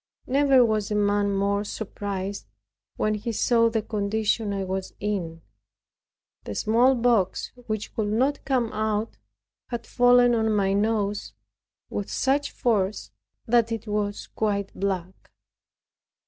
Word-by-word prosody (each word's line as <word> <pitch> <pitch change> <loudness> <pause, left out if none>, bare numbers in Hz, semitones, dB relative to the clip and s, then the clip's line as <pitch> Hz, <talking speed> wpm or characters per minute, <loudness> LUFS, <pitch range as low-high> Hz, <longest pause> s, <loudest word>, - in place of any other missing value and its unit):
Never 270 -2 +4
was 215 -3 0
a 210 - -1
man 205 0 +2
more 200 +1 +1
surprised, 200 - -5 0.5
when 215 - 0
he 215 +2 -3
saw 230 +1 +3
the 225 -1 -1
condition 215 0 -1
I 195 -1 -2
was 190 0 -4
in. 175 -6 -3 1.0
The 105 - -5
smallpox, 235 - +2 0.2
which 215 -1 -3
could 215 -2 0
not 255 +7 +1
come 250 -4 0
out, 215 +1 -1 0.5
had 235 -2 -5
fallen 245 0 +5
on 220 -1 +1
my 195 -1 +2
nose 205 0 0 0.6
with 205 - -3
such 280 +2 +1
force, 210 -4 -1 0.3
that 230 0 +3
it 225 -1 -3
was 205 -1 -2
quite 200 -2 -2
black. 190 -2 -4
210 Hz, 125 wpm, -25 LUFS, 200-230 Hz, 1.0 s, fallen